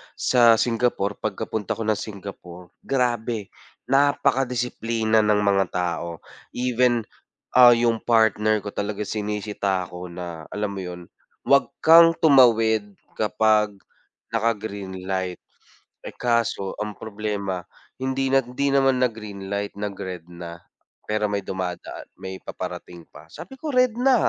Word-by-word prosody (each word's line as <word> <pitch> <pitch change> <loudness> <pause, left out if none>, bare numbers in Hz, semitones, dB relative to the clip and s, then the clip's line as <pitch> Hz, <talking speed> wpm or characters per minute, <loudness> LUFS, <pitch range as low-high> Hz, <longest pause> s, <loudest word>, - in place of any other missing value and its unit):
sa 120 -2 +5
Singapore 115 -3 0
pagka-punta 105 0 -3
ako 115 - -4
ng 105 - -1
Singapore, 90 -4 -9
grabe, 120 -5 -1 0.3
napaka-disiplina 125 -5 +1
ng 105 -1 +3
mga 100 -1 +3
tao, 85 -1 -3 0.3
even, 125 -1 +2 0.5
ah, 125 -1 +8
yung 115 -1 +1
partner 110 -2 +2
ko 105 - -5
talaga 105 +1 -3
sinisita 105 -2 -2
ako 90 0 -8
na 85 -2 -8
alam 105 -1 -2
mo 100 - -6
yun, 90 -1 -9 0.3
wag 140 0 +4 0.2
kang 165 +1 +8
tumawid 115 -7 +4 0.2
kapag 105 0 +2 0.6
naka 115 0 +2
greenlight 95 -3 -5 0.6
eh - - -9
kaso 115 -5 0
ang 105 -1 -4
problema, 105 -3 -4 0.4
hindi 130 0 -1
na 135 - +6
hindi 135 +3 -2
naman 135 -1 +3
nag 125 -2 +1
greenlight 100 -2 -5
nag 105 0 -3
red 90 -4 -6
na, 85 0 -9 0.5
pero 105 0 0
may 100 -1 -2
dumadaan 90 -2 -5
may 95 0 -8
paparating 90 -1 -7
pa 75 +2 -15
sabi 265 - -11
ko 315 - -5
"Red 255 -2 +4
na 265 +1 +5
105 Hz, 130 wpm, -23 LUFS, 95-120 Hz, 0.6 s, ah